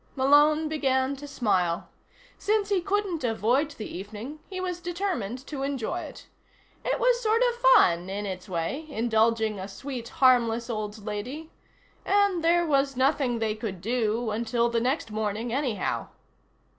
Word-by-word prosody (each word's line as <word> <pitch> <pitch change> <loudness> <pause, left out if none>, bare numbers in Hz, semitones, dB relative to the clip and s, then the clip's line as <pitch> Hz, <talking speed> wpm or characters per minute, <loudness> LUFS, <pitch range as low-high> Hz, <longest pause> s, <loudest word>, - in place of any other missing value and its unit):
Malone 295 +3 +4
began 270 -3 +1
to 290 +2 -9
smile. 185 -10 0 0.5
Since 420 -1 +1
he 395 -3 +2
couldn't 390 -4 -1
avoid 245 +5 +1
the 260 -8 -8
evening, 215 - -7
he 375 -1 -5
was 360 -1 -3
determined 340 - -3
to 285 -3 -6
enjoy 275 -4 -2
it. - - -9 0.6
It - - 0
was - - +3
sort 450 +1 +3
of 480 0 -3
fun, 180 - +5
in 205 +2 -3
its 190 0 -6
way, 185 - -3
indulging 225 -3 +1
a 190 - -5
sweet 240 +3 -7
harmless 240 -2 +3
old 215 -1 -5
lady. 250 +10 -5 0.5
And 400 -4 +2
there 345 +1 +4
was 275 -3 +1
nothing 260 -2 +2
they 220 -1 0
could 215 -4 -5
do 225 +2 0
until 235 +2 0
the 235 -1 0
next 255 -1 -1
morning, 215 +2 -2
anyhow. 260 -5 -1
255 Hz, 150 wpm, -27 LUFS, 220-315 Hz, 0.6 s, fun